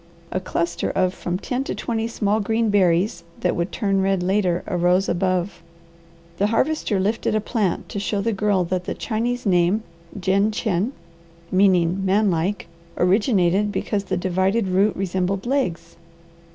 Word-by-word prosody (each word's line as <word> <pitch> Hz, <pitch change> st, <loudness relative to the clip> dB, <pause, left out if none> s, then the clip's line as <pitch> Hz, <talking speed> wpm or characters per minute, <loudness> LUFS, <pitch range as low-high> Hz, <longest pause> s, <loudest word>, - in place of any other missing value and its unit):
A 185 Hz, -, -1 dB
cluster 170 Hz, -2 st, -2 dB
of 185 Hz, -1 st, +1 dB
from 180 Hz, -1 st, -3 dB
ten 250 Hz, +6 st, -3 dB
to -, -, -3 dB
twenty 225 Hz, -2 st, -2 dB
small 215 Hz, -2 st, 0 dB
green 220 Hz, +1 st, 0 dB
berries, 190 Hz, +1 st, +2 dB, 0.2 s
that -, -, +1 dB
would 170 Hz, +1 st, -2 dB
turn 195 Hz, -4 st, 0 dB
red 190 Hz, -1 st, +1 dB
later, 185 Hz, -2 st, +1 dB
arose 180 Hz, 0 st, +2 dB
above. 185 Hz, +1 st, -1 dB, 0.8 s
The 200 Hz, -, +3 dB
Harvester 225 Hz, -2 st, 0 dB
lifted 210 Hz, +3 st, 0 dB
a -, -, +3 dB
plant 210 Hz, -4 st, -1 dB
to 200 Hz, -, -4 dB
show 205 Hz, +1 st, -1 dB
the 225 Hz, +3 st, 0 dB
Girl 200 Hz, -2 st, +1 dB
that 180 Hz, +1 st, -2 dB
the -, -, -3 dB
Chinese 240 Hz, +2 st, -2 dB
name, 185 Hz, +3 st, +2 dB, 0.4 s
Jin 195 Hz, +3 st, +2 dB
chen, 215 Hz, +1 st, -1 dB, 0.6 s
meaning 185 Hz, -1 st, +3 dB
man 200 Hz, +1 st, +3 dB
like, 175 Hz, +5 st, -1 dB, 0.3 s
originated 195 Hz, 0 st, +2 dB
because 200 Hz, -1 st, -2 dB
the -, -, -1 dB
divided 190 Hz, +4 st, +1 dB
root 195 Hz, +3 st, +2 dB
resembled 190 Hz, +1 st, -1 dB
legs. 245 Hz, -, -2 dB
195 Hz, 150 wpm, -22 LUFS, 180-215 Hz, 0.8 s, The